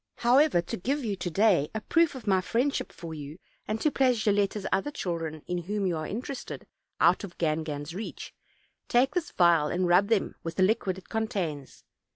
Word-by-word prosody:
However, 250 - +4
to - - -5
give 270 +8 -2
you 205 -3 -1
to 180 - -3
day 180 -5 +3
a 220 - -2
proof 330 +4 +2
of 260 - -9
my 190 -3 +3
friendship 250 +9 -1
for 165 -2 -8
you, 150 0 -8 0.3
and 215 +1 -2
to 305 - +2
place 255 -3 +3
Gilletta's 205 -1 +1
other 195 - +1
chil 180 - -3
dren, 155 -2 -6
in 180 0 -2
whom 200 +3 -2
you 180 -2 +1
are 155 -1 -4
interested, 250 +5 -6 0.3
out - - +4
of 185 -3 -8
Gangan's 155 -1 -2
reach, 210 +5 -7 0.5
take 260 +4 +3
this 355 -3 -1
vial, 170 -4 +4
and 180 +3 0
rub 180 +3 +4
them 220 -3 +1
with 165 0 -5
the 190 - +3
liquid 195 -2 +1
it 190 - -13
contains. 180 -11 -3
195 Hz, 195 wpm, -28 LUFS, 170-230 Hz, 0.5 s, However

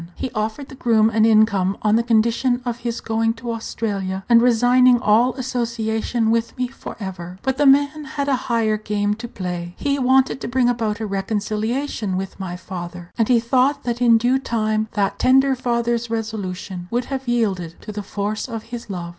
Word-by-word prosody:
He 260 - -4
offered 220 +6 -3
the - - -11
groom 225 -4 +2
an 220 0 +3
income 215 -4 +3
on 210 0 +3
the 230 - +4
condition 235 +2 +1
of 240 -1 -3
his 235 -1 -4
going 225 0 0
to 235 0 -5
Australia, 200 -4 -3
and 235 -1 +6
resigning 245 +1 +5
all 230 +3 +3
association 235 -3 -1
with 230 +2 -1
me 250 -1 -1
for 265 - -9
ever. 185 -3 -7
But 265 -1 0
the 290 - +4
man 285 +2 +3
had 280 +1 -3
a 275 - +3
higher 225 -2 +2
game 210 -1 -1
to 225 +3 -7
play. 180 -4 -5
He 280 0 0
wanted 260 +1 +3
to - - -4
bring 250 0 +2
about 225 -3 -1
a - - -1
reconciliation 210 +2 -2
with 195 +1 -5
my 185 -2 -4
father, 175 -1 -8
and 225 -2 +1
he 245 -2 +4
thought 255 +4 +1
that 240 0 -3
in 235 -2 +6
due 245 +3 +2
time 220 -4 -1
that 200 -1 -1
tender 270 +1 +4
father's 235 -2 -1
resolution 200 -5 -4
would 240 +1 -1
have 265 -1 -5
yielded 195 -8 0
to - - -7
the 210 0 -5
force 205 +3 -3
of 225 -2 -5
his 235 -2 -6
love. 175 -3 -5
225 Hz, 190 wpm, -21 LUFS, 210-245 Hz, -, and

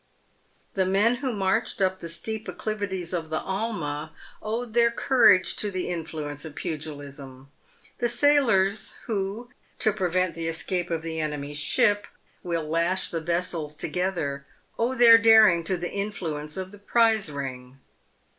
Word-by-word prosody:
The 190 -1 +1
men 210 +6 +3
who 260 0 -2
marched 200 +2 -1
up 190 -1 +1
the 170 - -7
steep 220 +6 -4
accli 215 - -3
vities 190 -4 -4
of 165 -3 -3
the 155 - -1
Alma 170 -7 -3 0.3
owed 225 +1 -4
their 235 0 +4
courage 235 -6 +4
to 210 - 0
the 185 -2 -3
influence 155 -4 -5
of 155 -2 -9
pugilism. 140 -3 -7 0.5
The 240 - +1
sailors 230 -8 +2
who, 215 +3 -3 0.3
to 215 - +3
prevent 185 -3 0
the 165 +1 -4
escape 175 +2 -2
of 165 -1 -2
the 160 -1 -4
enemy's 150 -1 -3
ship, 205 - +2 0.3
will 170 -4 -3
lash 170 +4 +1
the 165 - -3
vessels 170 -2 -2
together, 150 -5 -2 0.3
owe 240 +3 +1
their 230 -2 +8
daring 220 -6 +6
to 185 +1 0
the 175 0 -4
influence 170 -7 -4
of 190 0 -5
the 205 - -10
prize 220 -4 +2
ring. 130 -2 -7
185 Hz, 150 wpm, -26 LUFS, 160-215 Hz, 0.5 s, their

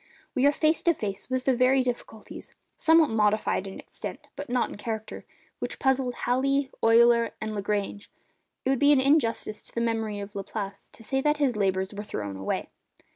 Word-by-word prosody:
We 265 0 +3
are - - +6
face 310 +2 +1
to 340 -1 +3
face 200 -2 -4
with 255 0 -1
the 265 - +3
very 255 +2 +4
difficulties—somewhat 255 +6 0
modified 210 -2 +1
in 195 - -8
extent, - - -8
but 285 -2 -7
not 245 0 +1
in - - -7
character—which 220 0 -7
puzzled 265 -2 +1
Halley, 275 +2 +1
Euler, 235 0 +5
and 215 0 -4
Lagrange. 205 0 -3 0.6
It 265 - +2
would 270 - +1
be 285 0 +5
an 275 - +4
injustice 260 -6 +1
to - - -16
the - - 0
memory 225 -3 -1
of 200 0 -7
Laplace 200 0 -6
to 225 - -16
say 270 +4 0
that 295 +1 +2
his 275 -5 +1
labours 190 -1 0
were 205 +1 -5
thrown 100 - -5
away. 95 0 -3
235 Hz, 180 wpm, -27 LUFS, 210-270 Hz, 0.6 s, are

